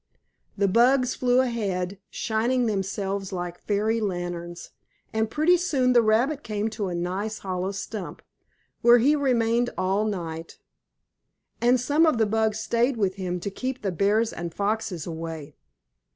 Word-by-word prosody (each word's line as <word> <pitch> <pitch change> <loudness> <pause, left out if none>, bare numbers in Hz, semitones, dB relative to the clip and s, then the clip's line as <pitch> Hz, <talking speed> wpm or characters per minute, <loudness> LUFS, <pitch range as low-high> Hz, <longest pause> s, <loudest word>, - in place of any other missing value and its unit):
The 200 0 +3
bugs 250 +5 +4
flew 250 0 +3
ahead, 200 -6 -2
shining 240 +3 0
themselves 195 -1 -2
like 175 -1 -5
fairy 220 +2 0
lanterns, 175 -3 -4 0.4
and 220 0 0
pretty 315 +7 +3
soon 270 -8 +1
the 240 - +6
rabbit 240 +7 +2
came 215 -2 -2
to 215 -3 -3
a 180 - -3
nice 190 +5 -3
hollow 185 0 -3
stump, 200 0 -6 0.6
where 240 0 +7
he 275 +6 +4
remained 245 -4 +2
all 195 +3 +1
night. 165 -5 -5 1.0
And 245 +2 +4
some 295 +6 +3
of 310 - +3
the 225 - +3
bugs 220 0 0
stayed 235 +3 +1
with 195 -3 0
him 180 -2 -3
to 200 - -3
keep 255 +5 -4
the 195 - 0
bears 205 +6 +1
and 170 0 -5
foxes 205 -2 -2
away. 160 -3 -6
215 Hz, 150 wpm, -25 LUFS, 185-240 Hz, 1.0 s, where